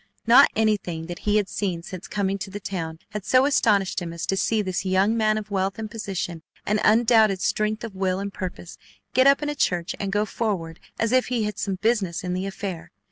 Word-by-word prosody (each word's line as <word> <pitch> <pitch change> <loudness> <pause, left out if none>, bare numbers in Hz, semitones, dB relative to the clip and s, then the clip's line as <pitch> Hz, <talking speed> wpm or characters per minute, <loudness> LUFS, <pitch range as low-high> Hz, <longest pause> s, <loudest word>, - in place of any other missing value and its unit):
Not 245 +5 +7
anything 205 -7 0
that 175 0 -7
he 210 - +4
had 205 -2 +1
seen 180 -5 -3
since 185 +2 -8
coming 200 -1 -1
to 195 - -5
the 200 +2 -6
town 165 -5 -4
had 210 0 -5
so 255 +5 +4
astonished 205 -9 +2
him 170 -1 -5
as 170 - -4
to 195 - 0
see 215 +2 +1
this 185 -1 -2
young 190 +3 +2
man 215 -1 +2
of 210 -1 -6
wealth 195 0 -1
and 220 -1 -6
position 190 -6 -4 0.2
and 210 +1 +1
undoubted 220 -3 +4
strength 215 +4 0
of 225 -3 -6
will 190 -1 0
and 200 0 -4
purpose, 180 -2 -7 0.3
get 260 +2 +5
up 275 +2 +5
in 295 - -1
a - - -1
church 180 -9 0
and 195 -1 -2
go 205 +1 +1
forward 185 -8 -3 0.2
as 230 0 0
if 255 0 +3
he 245 -3 0
had 210 -2 -3
some 195 -2 -1
business 200 -3 0
in 180 -1 -2
the 185 +2 -2
affair. 185 -4 -6
200 Hz, 225 wpm, -24 LUFS, 185-215 Hz, 0.3 s, Not